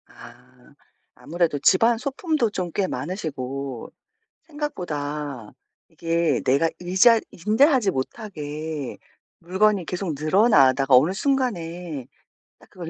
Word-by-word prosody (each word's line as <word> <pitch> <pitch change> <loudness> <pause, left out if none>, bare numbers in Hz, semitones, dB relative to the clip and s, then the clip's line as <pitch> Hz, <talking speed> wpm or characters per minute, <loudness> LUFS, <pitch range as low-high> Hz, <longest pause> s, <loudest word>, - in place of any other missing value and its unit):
아. 125 +2 -17 0.4
아무래도 165 -3 -1
집안 225 - +4
소품도 280 - -1
좀 180 -3 -4
꽤 195 -2 0
많으시고 140 - -5 0.5
생각보다 150 - -5 0.4
이게 165 -4 0
내가 140 +5 +3
의자 190 +6 +4 0.3
응대하지 245 0 +4
못하게 150 - -5 0.4
물건이 190 +1 +1
계속 180 -2 -3
늘어나다가 145 - +4
어느 150 +8 +4
순간에 180 - -2 0.5
딱 - - -21
그걸 175 -3 -8
170 Hz, 235 characters per minute, -23 LUFS, 145-210 Hz, 0.5 s, 집안